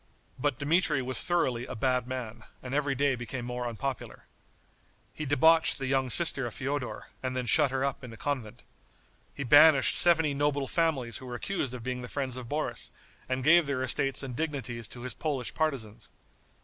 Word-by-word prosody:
But 145 -1 0
Dmitri 150 -1 +1
was 130 +1 -2
thoroughly 130 -9 0
a - - -6
bad 125 +1 0
man, 120 -4 -6 0.2
and 125 0 -6
every 140 -1 0
day 140 +1 +2
became 120 0 -6
more 125 0 -4
unpopular. 125 +3 -6 0.9
He 155 - -5
debauched 160 +3 +4
the 135 - -4
young 130 0 0
sister 135 -3 +5
of 115 - -9
Feodor, 135 -1 -4
and 130 0 -3
then 125 - -2
shut 145 +3 +4
her 135 +1 -1
up 140 -1 -4
in 125 - -8
a 115 - -11
convent. 125 -4 -4 0.7
He 140 - -4
banished 145 +2 +6
seventy 165 -4 +5
noble 145 -1 0
families 145 -9 -1
who 130 - -11
were 120 - -6
accused 135 -3 -3
of 120 - -9
being 125 0 -4
the 125 - -7
friends 130 -1 -3
of 125 -2 -7
Boris, 150 +1 -2 0.4
and 130 0 -2
gave 165 +2 +5
their 135 -2 -1
estates 135 +2 +2
and 130 -3 -6
dignities 125 -7 -4
to 120 - -11
his 125 -1 -3
Polish 140 -5 -4
partisans. 115 -9 -3
130 Hz, 190 wpm, -28 LUFS, 125-145 Hz, 0.9 s, banished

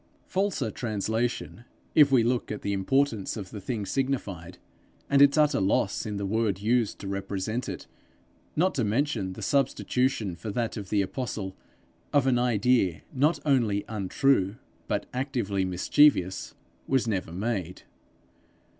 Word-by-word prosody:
Falser 185 - -1
translation, 110 +1 -2 0.3
if 145 -3 +6
we 125 -4 +5
look 120 0 0
at 105 - -5
the 100 - -1
importance 115 +2 0
of 95 -4 -7
the 105 - -7
thing 110 -1 -3
signified, 100 -10 -3 0.5
and 140 0 +5
its 140 +1 +6
utter 150 -6 +3
loss 100 +3 +1
in 105 -1 -3
the 100 - -2
word 105 -1 0
used 115 +1 +1
to 100 - -8
represent 100 +4 -3
it, - - -6 0.7
not 185 +4 +2
to 125 - 0
mention 105 -3 0
the - - -8
substitution 130 -6 0
for 105 +6 -7
that 115 +2 -2
of 100 -4 -6
the 100 -2 +2
apostle, 100 -3 -4 0.6
of 145 -2 +3
an 125 -2 +3
idea 115 -7 +2
not 145 +5 +2
only 115 -8 +2
untrue 105 0 +1 0.3
but - - -1
actively 120 -7 -1
mischievous, 95 +2 +2 0.3
was 130 -3 +1
never 95 -6 -2
made. 95 -2 -3
110 Hz, 145 wpm, -27 LUFS, 100-130 Hz, 0.7 s, if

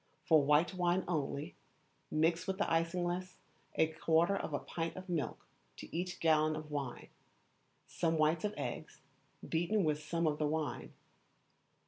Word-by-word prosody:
For 160 -2 +6
white 150 +6 +3
wine 180 0 +1
only, 150 -3 -2 0.6
mix 165 +3 +1
with 190 0 -1
the 205 - +2
isinglass 175 +2 0 0.4
a 160 - +5
quarter 160 +3 +2
of 185 - -3
a 145 - 0
pint 165 +2 -4
of 185 0 -8
milk 170 -5 -2 0.3
to - - -9
each 180 +1 -3
gallon 155 -1 +3
of 155 -1 -7
wine, 140 -4 -4 0.8
some 165 -1 0
whites 155 +1 +2
of 210 0 -1
eggs, - - -5 0.5
beaten 175 +5 +1
with 150 -1 +1
some 165 +2 -1
of 150 -1 +1
the 150 - +2
wine. 155 0 -3
165 Hz, 150 wpm, -34 LUFS, 155-175 Hz, 0.8 s, For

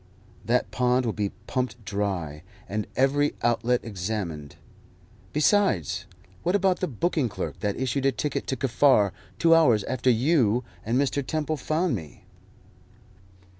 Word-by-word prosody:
That 120 +2 0
pond 125 0 +2
will 115 - -1
be 105 -2 -1 0.2
pumped 125 -4 -3
dry, 95 -8 -3 0.3
and 105 +1 -3
every 145 +3 +2
outlet 120 +1 +2
examined. 90 -8 -4 0.8
Besides, 150 - +2 0.4
what 180 - +1
about 190 -2 +2
the 185 - -1
booking 150 -1 0
clerk - - -5
that 105 0 -2
issued 130 +1 0
a - - +4
ticket 145 +2 -3
to 130 - -1
Kaffar 125 -4 +3 0.3
two 165 0 +5
hours 125 -11 +5
after 130 0 0
you 125 -2 +3 0.2
and 115 +3 0
Mr. 140 +1 +1
Temple 155 +3 -2
found 155 +4 0
me?" 80 -7 -9
125 Hz, 135 wpm, -26 LUFS, 105-145 Hz, 0.8 s, two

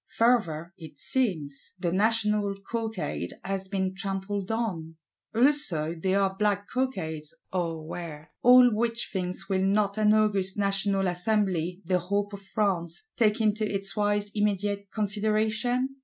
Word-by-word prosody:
Further, 185 -9 +2
it 155 -4 -11
seems, 160 - -2
the 175 -2 -1
National 210 0 +2 0.2
Cockade 220 - -3
has 190 0 -2
been 190 -1 -1
trampled 195 0 -3
on; 180 -9 -3 0.4
also 230 - +3
there 190 +4 +1
are 190 -1 +1
Black 205 0 0
Cockades, 160 - -3 0.2
or 165 -3 -2
were. 155 -2 -7
All 250 0 +8
which 230 +2 -1
things 185 0 -3
will 190 -1 +1
not 200 +2 +1
an 210 -1 +5
august 200 -3 +2
National 195 -1 +1
Assembly, 180 -1 0
the 180 +1 +2
hope 200 +3 -1
of 200 - -7
France, 195 - -2
take 215 -2 +2
into 215 0 +2
its 195 -2 -3
wise 205 0 +1
immediate 205 -1 0
consideration? 220 +5 0
200 Hz, 135 wpm, -27 LUFS, 180-215 Hz, 0.4 s, All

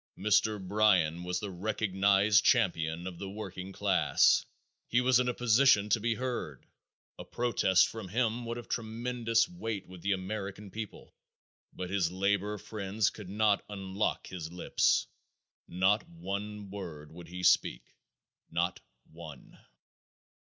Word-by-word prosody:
Mr. 105 +1 +2
Bryan 95 -4 +2
was 90 0 -2
the 100 0 -5
recognized 100 +1 +2
champion 85 -8 +2
of 90 -2 -7
the 100 - -5
working 95 -2 -7
class. - - +3 0.4
He 120 - +2
was 125 0 +4
in 125 0 +1
a - - 0
position 120 -3 +4
to 110 - +3
be 115 +1 0
heard. 120 - -4 0.5
A - - -5
protest 110 -6 +2
from 110 -4 -7
him 115 +3 0
would 115 +1 -4
have 120 - -8
tremendous 115 +1 0
weight 115 - -5
with 90 -1 -12
the 100 +2 +1
American 100 +1 -5
people. 110 -1 -8 0.6
But 90 0 -6
his 95 -4 +1
labor 100 +2 0
friends 105 +2 -1
could 105 -4 -10
not 105 0 +2
unlock 95 0 -2
his 85 -3 -7
lips. 90 - +1 0.6
Not 95 +4 +1
one 100 +4 -6
word 85 -7 -8
would 85 +1 -11
he 90 +2 -7
speak. - - +3 0.6
Not - - -1 0.3
one. 80 -3 -11
100 Hz, 135 wpm, -31 LUFS, 90-110 Hz, 0.6 s, was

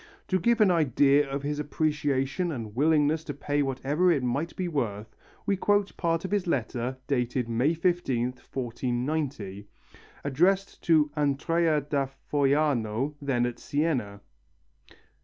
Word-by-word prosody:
To 185 - +2
give 235 +4 +2
an 200 -3 +6
idea 145 -2 +3
of 140 +1 -3
his 145 +1 -2
appreciation 150 +2 0
and 115 -7 -6
willingness 155 +2 +3
to 145 - -5
pay 145 +1 -1
whatever 140 +6 +1
it 140 -6 +1
might 140 +7 -2
be 185 - -2
worth, 110 -9 -3 0.3
we 200 - +2
quote 205 +1 +1
part 165 0 0
of 190 - -5
his 200 -3 0
letter 125 -3 -1
dated 125 -2 -1
May 125 +8 +1
15th, 130 -8 0
1490, 120 -4 -3 0.6
addressed 180 +8 +1
to 155 -3 +4
Andrea 155 +2 +1
da 140 -1 -1 0.2
Foiano 140 -3 +1
then 130 -4 +1
at 120 -1 -4
Siena. 130 -10 -1
145 Hz, 135 wpm, -27 LUFS, 125-160 Hz, 0.6 s, an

